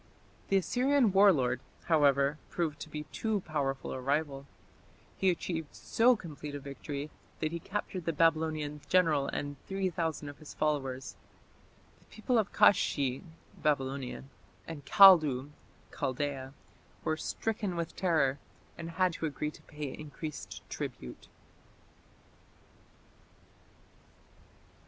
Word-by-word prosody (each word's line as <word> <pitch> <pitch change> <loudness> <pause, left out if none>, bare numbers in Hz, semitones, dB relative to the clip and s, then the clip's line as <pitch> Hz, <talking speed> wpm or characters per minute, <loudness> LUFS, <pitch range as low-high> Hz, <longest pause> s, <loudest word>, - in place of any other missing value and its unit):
The 195 - +3
Assyrian 250 +4 +3
war 200 +1 +8
lord, 130 -6 +1 0.2
however, 145 -2 +3
proved 155 -4 -2
to 155 - -7
be 150 0 -5
too 220 -3 -1
powerful 140 -5 -2
a 130 - -4
rival. 140 0 -1 0.7
He 190 - +2
achieved 165 -3 -3
so 245 +2 +3
complete 150 -7 -8
a - - -4
victory 140 +1 -6 0.3
that 155 -1 -1
he 170 - -3
captured 190 -1 -4
the 165 - +1
Babylonian 155 -2 +1
general 160 -6 +3
and 145 -1 -4
3000 175 -6 -2
of 145 - -9
his 155 - -11
followers. 135 -4 -1 0.8
The - - -26
people 235 +2 0
of 210 - -1
Kashshi 135 -8 +3 0.4
(Babylonia) 135 -3 -1 0.4
and 160 -3 -7
Kaldu 155 -9 +7 0.4
(Chaldaea) 135 0 -3 0.5
were 155 - +1
"stricken 205 +2 -2
with 170 -1 -3
terror", 155 -7 +2 0.4
and 165 0 -5
had 185 -2 +3
to 160 - -2
agree 150 +1 -3
to - - -16
pay 150 -2 -6
increased 155 0 -7
tribute. 65 - -6
155 Hz, 120 wpm, -31 LUFS, 140-180 Hz, 0.8 s, war